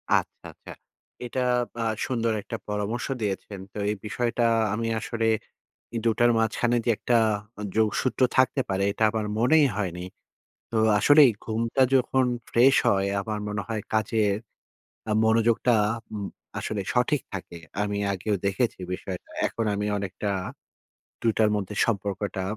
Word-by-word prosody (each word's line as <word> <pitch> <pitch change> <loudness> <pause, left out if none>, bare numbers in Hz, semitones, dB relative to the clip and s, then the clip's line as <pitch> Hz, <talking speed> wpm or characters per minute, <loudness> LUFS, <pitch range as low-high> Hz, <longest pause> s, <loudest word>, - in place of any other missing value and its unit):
আচ্ছা, - - -2
আচ্ছা। - - -13 0.5
এটা 125 +2 -2 0.4
আ - - 0 0.2
সুন্দর 115 -3 0
একটা 115 - -6
পরামর্শ 105 +3 -2
দিয়েছেন। 100 -1 -3
তো - - -9
এই 105 - 0
বিষয়টা 120 +2 0 0.3
আমি 115 +1 -1
আসলে 115 -1 -2 0.7
ই - - -2
২ 115 - +4
টার 120 0 +5
মাঝখানে 115 +2 +1
যে - - +4
একটা 120 - +2 0.4
আ - - -4
যোগসূত্র 110 +4 +1 0.2
থাকতে 130 +1 +3
পারে। 95 0 0
এটা 110 - 0
আমার 110 -1 -2
মনেই 145 +6 +5
হয়নি। 90 -4 -3 0.7
তো 115 - -2 0.2
আসলেই 145 +1 +7
ঘুমটা 115 +4 0
যখন 130 0 +3 0.3
ফ্রেশ 130 +3 +5
হয় 100 0 +2
আমার 105 +1 -3
মনে 105 -1 -2
হয় 110 -2 -2
কাজের 110 -2 +2 0.7
আ - - +2
মনোযোগটা 115 +2 +3 0.4
উম 100 -2 -3 0.3
আসলে 105 -2 -3
সঠিক 130 +4 +2
থাকে। 90 -3 -7 0.2
আমি 100 0 -2
আগেও 100 +2 -1
দেখেছি 100 +5 0 0.2
বিষয়টা। 90 0 -7 0.2
এখন 115 - -3
আমি 105 +1 -2
অনেকটা 100 +1 -3 0.9
২ 115 - +3
টার 110 -1 +4
মধ্যে 105 0 -3
সম্পর্কটা 100 -3 -2
110 Hz, 145 wpm, -26 LUFS, 100-120 Hz, 0.9 s, আসলেই